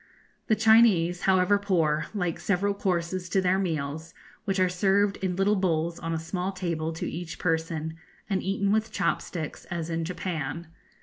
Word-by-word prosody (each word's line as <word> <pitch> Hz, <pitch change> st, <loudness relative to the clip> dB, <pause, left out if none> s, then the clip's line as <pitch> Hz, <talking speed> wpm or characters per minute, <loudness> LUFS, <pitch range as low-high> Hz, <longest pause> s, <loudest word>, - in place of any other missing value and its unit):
The 220 Hz, -, +4 dB
Chinese, 215 Hz, -6 st, +5 dB
however 190 Hz, +2 st, +4 dB
poor, 165 Hz, -7 st, +1 dB
like 175 Hz, -4 st, -1 dB
several 200 Hz, +3 st, +1 dB
courses 180 Hz, -2 st, -2 dB
to 195 Hz, -, +2 dB
their 185 Hz, 0 st, +2 dB
meals, 160 Hz, -3 st, -3 dB, 0.3 s
which 195 Hz, -2 st, 0 dB
are 185 Hz, -, +4 dB
served 195 Hz, +2 st, +2 dB
in 185 Hz, -2 st, -2 dB
little 195 Hz, +3 st, +2 dB
bowls 170 Hz, -3 st, 0 dB
on 165 Hz, -, -4 dB
a 165 Hz, -, 0 dB
small 180 Hz, +4 st, -3 dB
table 170 Hz, -4 st, -2 dB
to 160 Hz, -, -4 dB
each 170 Hz, 0 st, -5 dB
person, 160 Hz, -1 st, -1 dB, 0.3 s
and 195 Hz, -3 st, 0 dB
eaten 195 Hz, +1 st, 0 dB
with 220 Hz, +1 st, +1 dB
chop -, -, 0 dB
sticks, 160 Hz, -4 st, -6 dB
as 170 Hz, -2 st, -4 dB
in 165 Hz, 0 st, -1 dB
Japan. 170 Hz, -2 st, -4 dB
180 Hz, 170 wpm, -27 LUFS, 165-195 Hz, 0.3 s, Chinese